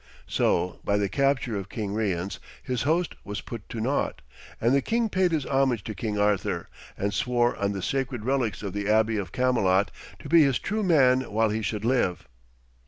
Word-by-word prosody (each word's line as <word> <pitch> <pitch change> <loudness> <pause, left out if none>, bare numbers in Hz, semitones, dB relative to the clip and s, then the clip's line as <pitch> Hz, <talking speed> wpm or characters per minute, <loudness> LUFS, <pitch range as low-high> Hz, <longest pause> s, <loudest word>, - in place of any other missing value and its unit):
So, 90 +1 0
by 100 - +1
the 100 -1 +1
capture 135 -3 +1
of 95 -1 -6
King 105 -3 -4
Rience, 100 -4 -2 0.2
his 125 -4 -2
host 170 +1 +1
was 100 0 -5
put 115 -4 -9
to 115 - -5
naught, 130 - -1 0.4
and 120 +3 +2
the 140 - +4
king 230 - 0
paid 185 -2 +2
his 155 -4 0
homage 135 -6 +1
to 110 - -5
King 105 0 -3
Arthur, 105 -1 0 0.3
and 100 +1 -1
swore 120 -1 +1
on 100 0 0
the 95 -2 -4
sacred 130 -4 -2
relics 125 -6 0
of 100 -3 -4
the 100 0 -2
Abbey 110 0 +3
of 95 -4 -4
Camelot 105 -7 +2 0.3
to - - -10
be 170 -1 +6
his 140 -4 +3
true 215 +1 -2
man 130 - +3
while 110 +1 +2
he 110 +1 -1
should 105 0 -3
live. 120 -8 +1
115 Hz, 195 wpm, -26 LUFS, 100-135 Hz, 0.4 s, be